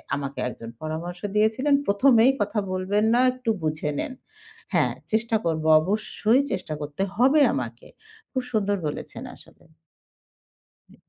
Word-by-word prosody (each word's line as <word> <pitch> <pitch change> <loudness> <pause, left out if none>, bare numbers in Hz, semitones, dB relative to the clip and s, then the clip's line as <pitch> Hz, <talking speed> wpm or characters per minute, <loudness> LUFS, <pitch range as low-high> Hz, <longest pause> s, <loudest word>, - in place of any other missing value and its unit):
আমাকে 140 -1 -5
একজন 115 -2 -9
পরামর্শ 165 +3 -5 0.2
দিয়েছিলেন। 220 +7 +2
"১ম 205 +7 +4
এই 265 - +6
কথা 210 +1 0
বলবেন 190 +3 0
না, 240 - +4
একটু 255 -2 -5
বুঝে 155 -1 -1
নেন।" 260 - -3 0.6
হ্যাঁ - - +3 0.2
চেষ্টা 225 +1 +1
করবো। 160 -1 0
অবশ্যই 215 - +1
চেষ্টা 185 -5 -3
করতে 145 +6 -3
হবে 270 +6 +4
আমাকে। 120 -2 -5 0.4
খুব 260 - -1
সুন্দর 205 -2 +1
বলেছেন 145 - -6
আসলে। - - -19 1.3
উ - - -18
200 Hz, 135 wpm, -25 LUFS, 155-225 Hz, 1.3 s, এই